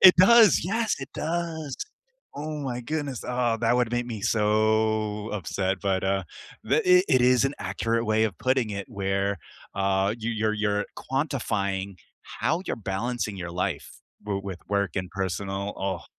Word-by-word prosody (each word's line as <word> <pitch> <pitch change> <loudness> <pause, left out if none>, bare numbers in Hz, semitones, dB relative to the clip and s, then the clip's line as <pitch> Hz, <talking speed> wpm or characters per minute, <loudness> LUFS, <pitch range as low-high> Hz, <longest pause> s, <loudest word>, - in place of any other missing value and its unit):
It 185 -1 +10
does, 215 +1 +7
yes, 225 +4 0
it 135 - -7
does. 160 -3 -3 0.6
Oh 150 0 -4
my 125 -3 -3
goodness, 145 -1 -3
ah, 125 -2 0
that 115 +1 +2
would 120 -2 +1
make 120 0 0
me 115 -4 -5
so 110 0 +1
upset, 95 -1 -1
but, 95 -2 0
uh, 95 0 +1 0.4
the - - +2 0.2
it 180 - +3
it 130 -2 +4
is 125 0 +5
an 135 - -1
accurate 115 +4 -1
way 110 +1 +3
of 100 -5 -4
putting 130 -4 +1
it 100 -1 -5
where, 100 0 -1 0.4
uh, 95 +1 +1
you 115 +1 -2
you're 110 -1 0
you're 105 -1 0
quantifying 100 - -2 0.4
how 160 +3 +1
you're - - -2
balancing 105 +1 -3
your 90 -1 -5
life 90 -3 -3 0.3
w 100 -2 -2
with 95 -3 -5
work 100 -1 0
and 90 -1 -3
personal 95 +1 -3
ugh. 95 0 -2
110 Hz, 165 wpm, -26 LUFS, 100-125 Hz, 0.6 s, It